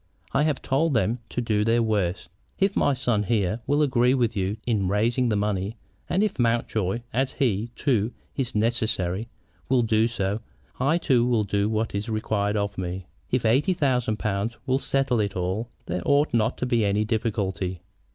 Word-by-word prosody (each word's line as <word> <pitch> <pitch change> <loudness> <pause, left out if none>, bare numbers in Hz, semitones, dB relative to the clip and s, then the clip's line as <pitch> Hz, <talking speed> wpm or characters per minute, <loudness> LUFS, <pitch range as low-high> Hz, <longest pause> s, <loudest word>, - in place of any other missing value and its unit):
I 135 - +3
have 150 -3 -1
told 140 +2 +1
them 115 +2 +1
to 125 - -2
do 105 -3 +1
their 115 +2 +3
worst. 95 -5 0 0.3
If 195 0 +1
my 140 - +3
son 120 -5 +1
here 105 0 0
will 145 +2 +3
agree 130 -2 +3
with 120 -3 +1
you 100 +2 -1
in 105 -6 +1
raising 115 +5 +1
the 105 - +1
money, 100 +1 -1 0.3
and 190 +4 +2
if 205 -9 -1
Mountjoy, 115 -3 0
as 130 +3 0
he, 115 -5 0
too, 120 -5 +1 0.2
is 130 -4 -2
necessary, 110 -2 0 0.4
will 125 -2 +4
do 110 0 +3
so, 105 -3 -2 0.4
I 140 +6 +3
too 130 -8 +3
will 120 -3 +2
do 100 +1 0
what 110 0 -1
is 100 +3 -3
required 110 -1 0
of 100 -1 -2
me. 90 0 -4 0.2
If 125 -2 0
eighty 135 - +3
thousand 125 -9 +1
pounds 105 +3 -2
will 130 -1 +1
settle 135 -4 +1
it 100 -2 -1
all, 95 +6 -2 0.2
there 90 +1 -2
ought 140 - +2
not 115 0 +1
to - - -2
be 120 -3 +2
any 105 +1 +1
difficulty. 95 -5 -2
115 Hz, 180 wpm, -25 LUFS, 100-125 Hz, 0.4 s, will